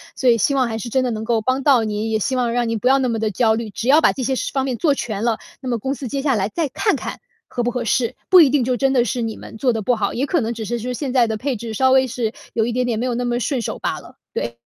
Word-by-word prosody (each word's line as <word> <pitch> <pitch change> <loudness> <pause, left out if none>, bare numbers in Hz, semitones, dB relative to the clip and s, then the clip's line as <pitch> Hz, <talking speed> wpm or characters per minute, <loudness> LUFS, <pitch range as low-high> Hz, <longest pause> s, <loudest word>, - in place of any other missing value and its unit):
所 260 - -1
以 230 - +5
希 280 - +2
望 260 -3 +2
还 225 0 -3
是 235 - -5
真 260 +2 +1
的 250 - 0
能 220 -1 -4
够 230 -1 +1
帮 255 +4 0
到 270 -4 +4
您， 215 +1 -2
也 220 - +1
希 260 +5 -1
望 245 -2 0
让 240 -1 0
您 225 -1 -1
不 250 - 0
要 270 - +5
那 260 -2 0
么 225 - -1
地 220 -1 0
焦 220 +2 +2
虑。 225 -1 -3
只 230 +4 -5
要 300 +4 +6
把 - - +5
这 260 - -4
些 265 +2 0
事 - - -2
方 270 -1 0
面 260 - -1
做 295 -5 +2
全 215 -4 -4
了， 230 -2 +1 0.2
那 260 - -4
么 235 - 0
公 265 +5 -2
司 270 -2 -6
接 275 - -3
下 275 - +2
来 205 -2 0
再 325 +2 -1
看 270 - +1
看 - - -6 0.3
合 245 - -3
不 240 - 0
合 245 -1 -3
适， 240 +2 0
不 365 -1 +9
一 290 - +6
定 275 -2 +2
就 250 +1 0
真 270 +2 +1
的 250 -3 +3
是 245 0 -2
你 225 -1 -3
们 - - -11
做 250 +1 +2
得 220 -2 -3
不 245 - +2
好， 210 -3 -1
也 260 - 0
可 335 +1 +1
能 230 0 -2
只 220 -1 -6
是 240 +3 -2
说 250 +3 -4
现 265 0 -4
在 245 -3 +4
的 220 -1 -2
配 265 +2 -2
置 225 0 -6
稍 260 +3 +3
微 260 0 +4
是 230 -2 -2 0.2
有 225 -1 +1
一 240 - -1
点 250 +1 0
点 230 - 0
没 240 - -1
有 250 - -1
那 245 +1 -2
么 240 0 0
顺 255 0 -1
手 - - -4
罢 - - -3
了， - - -15 0.2
对。 120 0 -3
245 Hz, 365 characters per minute, -20 LUFS, 225-260 Hz, 0.3 s, 不